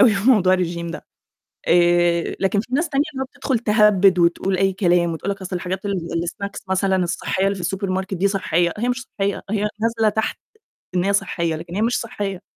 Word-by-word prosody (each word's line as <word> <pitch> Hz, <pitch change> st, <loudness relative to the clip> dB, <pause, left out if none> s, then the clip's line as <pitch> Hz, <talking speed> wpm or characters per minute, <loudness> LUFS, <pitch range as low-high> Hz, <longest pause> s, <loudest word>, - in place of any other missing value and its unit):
أوي 235 Hz, -5 st, +6 dB
في 200 Hz, +6 st, +3 dB
موضوع 190 Hz, -7 st, +4 dB
الرجيم 170 Hz, -2 st, -2 dB
ده. 170 Hz, -, -7 dB, 0.6 s
آآ 175 Hz, 0 st, +3 dB
لكن 195 Hz, +1 st, +1 dB
في 215 Hz, -, -4 dB
ناس 330 Hz, +3 st, 0 dB
تانية 275 Hz, 0 st, +2 dB
اللي 265 Hz, -, -4 dB
هو -, -, -1 dB
بتدخل 260 Hz, -5 st, -1 dB
تهبّد 210 Hz, -4 st, +4 dB
وتقول 175 Hz, +2 st, +2 dB
أي 195 Hz, +1 st, +2 dB
كلام 175 Hz, -3 st, +2 dB
وتقول 175 Hz, +5 st, -3 dB
لك: 195 Hz, -, -6 dB
"أصل 185 Hz, 0 st, -4 dB
الحاجات 185 Hz, +2 st, -4 dB
ال 200 Hz, -1 st, -1 dB, 0.3 s
الsnacks 200 Hz, +3 st, -5 dB
مثلًا 190 Hz, 0 st, +2 dB
الصحية 185 Hz, +2 st, -1 dB
اللي 200 Hz, -, 0 dB
في 195 Hz, +3 st, -1 dB
الSupermarket 190 Hz, 0 st, -2 dB
دي 195 Hz, +3 st, +2 dB
صحية." 175 Hz, -3 st, 0 dB
هي 240 Hz, +4 st, -1 dB
مش 250 Hz, +1 st, -1 dB, 0.2 s
صحية 200 Hz, 0 st, -1 dB
هي 210 Hz, 0 st, 0 dB
نازلة 225 Hz, -1 st, +2 dB
تحت 220 Hz, +1 st, -2 dB, 0.6 s
إن 180 Hz, -, +2 dB
هي 200 Hz, +1 st, +1 dB
صحية، 170 Hz, -4 st, 0 dB
لكن 170 Hz, +2 st, -8 dB
هي 205 Hz, -, 0 dB
مش 235 Hz, +2 st, +1 dB
صحية. 200 Hz, -4 st, -4 dB
195 Hz, 205 wpm, -21 LUFS, 175-210 Hz, 0.6 s, أوي